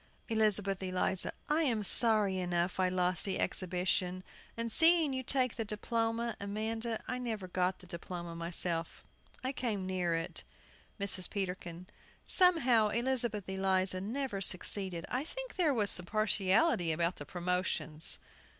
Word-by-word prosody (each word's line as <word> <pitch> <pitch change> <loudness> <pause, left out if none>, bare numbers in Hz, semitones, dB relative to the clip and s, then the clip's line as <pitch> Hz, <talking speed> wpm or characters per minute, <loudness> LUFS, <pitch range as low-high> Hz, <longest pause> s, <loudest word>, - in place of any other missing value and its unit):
ELIZABETH 205 -3 +1
ELIZA. 185 0 0 0.2
I 305 +2 +2
am 235 -9 0
sorry 210 -2 +4
enough 175 0 -1
I 185 -1 +3
lost 180 -1 0
the 195 - -1
exhibition, 180 0 -1 0.3
and 230 0 -3
seeing 325 +1 +6
you 260 - -2
take 255 -1 0
the 225 - -1
diploma, 230 +2 -2
Amanda. 220 +3 -3
I 250 - -3
never 220 -6 -4
got 180 +1 -1
the - - -16
diploma 170 0 -7
myself. 170 0 -2 0.4
I 260 - -1
came 220 -8 -3
near 180 -3 -1
it. 165 0 -4 0.6
MRS. 195 -2 +2
PETERKIN. 180 -3 -5 0.4
Somehow, 265 - +4
Elizabeth 235 -2 0
Eliza 190 -1 +1
never 225 0 -3
succeeded. 185 -1 0
I 255 +3 -2
think - - -7
there 340 -5 +2
was 210 -7 +3
partiality 205 - +1
about 170 +3 -1
the 145 - -8
promotions. 175 -3 0
195 Hz, 135 wpm, -32 LUFS, 180-230 Hz, 0.6 s, seeing